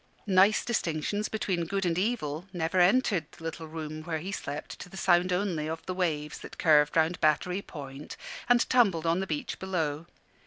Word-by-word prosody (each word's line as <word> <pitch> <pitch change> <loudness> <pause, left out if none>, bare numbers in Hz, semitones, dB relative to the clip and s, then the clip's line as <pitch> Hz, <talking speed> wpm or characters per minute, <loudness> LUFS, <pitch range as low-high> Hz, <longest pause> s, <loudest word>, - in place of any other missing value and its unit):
Nice 195 +1 +4
distinctions 205 -1 -1
between 190 -6 -1
good 195 +2 -1
and 170 -1 +1
evil 180 -5 -1
never 175 0 0
entered 195 -1 +3
the - - -14
little 165 0 -5
room 155 -1 -6
where 160 0 -3
he 180 +5 -5
slept 145 -6 -5
to 180 - -9
the 190 - -10
sound 180 -1 +3
only 180 -5 0
of 160 0 -5
the 185 - -3
waves 155 -5 -2
that - - -10
curved 150 -1 +4
round 160 +2 +2
Battery 180 +5 +2
Point 140 -4 -9 0.3
and 245 -1 +5
tumbled 195 -10 +3
on 165 +2 +2
the 195 - -2
beach 150 -3 -3
below. 165 -4 -2
170 Hz, 185 wpm, -29 LUFS, 155-190 Hz, 0.3 s, and